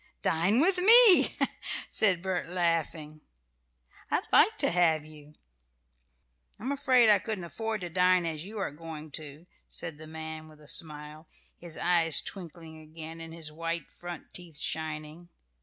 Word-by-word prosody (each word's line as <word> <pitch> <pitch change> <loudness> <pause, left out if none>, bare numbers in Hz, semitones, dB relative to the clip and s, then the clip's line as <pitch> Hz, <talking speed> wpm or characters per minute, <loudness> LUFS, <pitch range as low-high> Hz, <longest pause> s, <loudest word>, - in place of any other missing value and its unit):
"Dine 185 - -1
with 365 +3 0
me," 445 0 +10 0.5
said 185 -5 -2
Bert, 185 -3 -6
laughing. 165 -3 -5 0.9
"I'd - - -3
like - - +3
to - - -3
have 160 -3 -1
you." 150 -1 -16 1.3
"I'm 250 +7 -7
afraid 255 -4 0
I 210 -2 +2
couldn't 210 -2 -8
afford 220 +4 -8
to 175 - -8
dine 180 0 0
as 160 -2 -7
you 210 +4 -12
are 195 - -6
going 155 0 -12
to," 150 +2 -11 0.2
said 160 -3 -6
the 155 - -12
man, 160 0 -11
with 155 -1 -20
a 150 - -20
smile, 150 0 -2 0.3
his 170 -2 -13
eyes 165 -4 0
twinkling 165 -4 -13
again 160 +1 -13
and 165 0 -12
his 160 -2 -8
white 165 +2 -8
front 175 -2 -13
teeth 170 -4 -12
shining. 155 +2 -8
165 Hz, 150 wpm, -25 LUFS, 155-185 Hz, 1.3 s, me